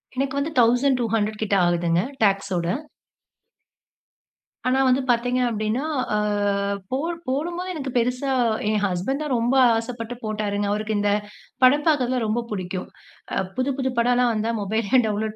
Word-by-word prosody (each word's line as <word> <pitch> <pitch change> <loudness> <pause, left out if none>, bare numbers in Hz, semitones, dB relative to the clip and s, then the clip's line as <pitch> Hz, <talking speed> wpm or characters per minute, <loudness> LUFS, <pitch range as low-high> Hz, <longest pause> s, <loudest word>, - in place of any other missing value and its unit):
எனக்கு 275 +1 -1
வந்து 310 +3 -2
1200 230 -3 +2
கிட்ட 200 -1 +1
ஆகுதுங்க 170 0 +1 0.2
டாக்ஸ் 195 -1 +2
ஓட. 170 0 -1 2.0
ஆனா 260 +1 +2
வந்து 255 +1 +3
பார்த்தீங்க 245 +1 +2
அப்டின்னா, 220 +4 -1 0.3
ஆ - - +2 0.7
போ 260 - +1 0.3
போடும்போது 345 +7 -2
எனக்கு 275 -5 -4
பெருசா 250 +3 0 0.4
என் 215 -1 +1
ஹஸ்பண்ட் 195 +11 -1
தான் 285 -4 -2
ரொம்ப 240 +3 +1 0.2
ஆசப்பட்டு 230 0 -5
போட்டாருங்க. 205 -1 -2
அவருக்கு 215 +1 -1
இந்த 205 0 +2 0.5
படம் 290 +4 +5
பார்க்குறதுலாம் 255 -5 +2
ரொம்ப 230 +3 0
புடிக்கும். 185 -2 -4 0.5
அ - - 0 0.2
புது 260 +2 0
புது 260 -1 0
படம்லாம் 245 0 +3
வந்தா 220 +2 -1
மொபைலயே 220 +4 +1
டவுன்லோட் 215 +1 -2
230 Hz, 135 wpm, -23 LUFS, 210-260 Hz, 2.0 s, படம்